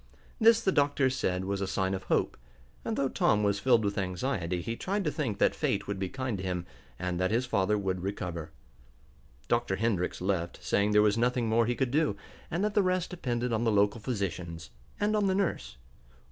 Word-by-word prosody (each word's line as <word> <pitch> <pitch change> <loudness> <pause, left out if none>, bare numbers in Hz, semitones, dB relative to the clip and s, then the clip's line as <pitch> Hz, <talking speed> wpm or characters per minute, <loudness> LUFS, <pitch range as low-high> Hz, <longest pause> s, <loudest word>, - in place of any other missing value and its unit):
This 230 0 +6
the 190 - +3
doctors 140 -4 +2
said 90 -4 -1
was 100 0 -2
a 100 - -1
sign 95 0 0
of 95 -1 -4
hope, - - +1 0.5
and, 225 - -2
though 140 - +2
Tom 105 -4 +2
was 100 0 +1
filled 120 -2 +3
with 100 0 -1
anxiety, 90 -1 -2
he 115 - -3
tried 200 - -2
to 150 - 0
think 125 -11 -2
that - - +3
fate 100 0 -1
would 100 -1 -4
be 95 -1 -2
kind 130 -5 -3
to - - -5
him, 90 -2 -2 0.3
and 90 -1 -2
that 95 0 +1
his 120 +4 +1
father 105 -3 +1
would 95 -3 -2
recover. 90 -4 -4 1.0
Dr. 120 -5 +1
Hendrix 100 -4 -1
left, 90 -2 -1
saying 100 +1 +2
there 105 0 +5
was 105 +1 +2
nothing 125 0 +1
more 115 +1 +3
he 120 - 0
could 130 -1 -1
do, 150 -6 +2 0.3
and 175 +3 -1
that 210 0 0
the 205 - +4
rest 185 -1 0
depended 125 -8 -2
on 110 +1 +1
the 115 - +2
local 105 +2 +2
physicians, 90 - -4 0.3
and 210 +1 +1
on 205 -2 +2
the 190 - +2
nurse. 65 - -2
105 Hz, 210 wpm, -29 LUFS, 95-130 Hz, 1.0 s, This